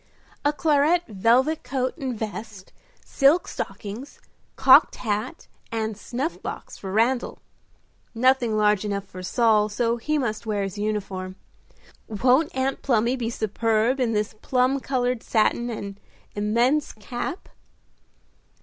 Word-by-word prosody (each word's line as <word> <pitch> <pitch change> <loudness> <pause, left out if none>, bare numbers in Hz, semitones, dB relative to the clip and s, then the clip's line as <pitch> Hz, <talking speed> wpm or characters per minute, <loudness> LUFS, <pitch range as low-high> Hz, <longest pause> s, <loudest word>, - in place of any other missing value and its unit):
"A 290 - +3
claret 305 +3 +2
velvet 235 +9 +2
coat 255 0 -2
and 260 -7 -4
vest, 215 -2 -7 0.3
silk 290 +6 +3
stockings, 220 +7 -6 0.4
cocked - - +6
hat 225 +7 -3 0.2
and 220 -1 -2
snuff 250 - -4
box - - -7
for 190 - -7
Randal. 235 +5 +1 0.8
Nothing 245 -2 +3
large 210 -1 +3
enough 200 -1 -3
for 185 -1 -10
Saul, 215 +2 +2
so 235 +2 0
he 305 +6 -1
must 235 -5 -3
wear 205 -2 0
his 195 0 -4
uniform. 195 -3 -3 0.7
Won't 255 +8 +2
Aunt 265 +1 -1
Plumy 235 -1 +2
be 235 -3 -3
superb 225 +3 0
in 240 -3 +1
this 210 0 -1
plum 255 +1 +1
colored 250 -3 -1
satin 235 +2 +1
and 200 -3 -6 0.3
immense 235 +8 +1
cap?" 240 - -6
230 Hz, 125 wpm, -24 LUFS, 210-260 Hz, 0.8 s, cocked